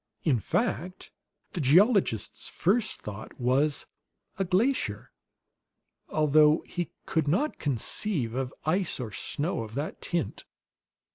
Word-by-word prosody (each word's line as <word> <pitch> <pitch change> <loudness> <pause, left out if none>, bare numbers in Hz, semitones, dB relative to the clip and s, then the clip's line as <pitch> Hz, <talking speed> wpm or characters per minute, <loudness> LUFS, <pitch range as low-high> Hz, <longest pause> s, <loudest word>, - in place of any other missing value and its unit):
In 135 -8 +3
fact, 185 - -2 0.4
the 175 - -3
geologist's 175 - +3
first 215 +5 0
thought 105 +4 -8
was 135 +4 +2 0.5
"A - - +3
glacier," 180 - 0 1.0
although 155 0 +4
he 175 -2 -4 0.2
could 160 -3 0
not 205 - +1
conceive 140 - 0
of 130 0 -2
ice 175 +1 +1
or 120 -4 -4
snow 150 - -2
of 110 0 -7
that 145 +3 -4
tint. 170 -3 -3
155 Hz, 115 wpm, -28 LUFS, 125-185 Hz, 1.0 s, although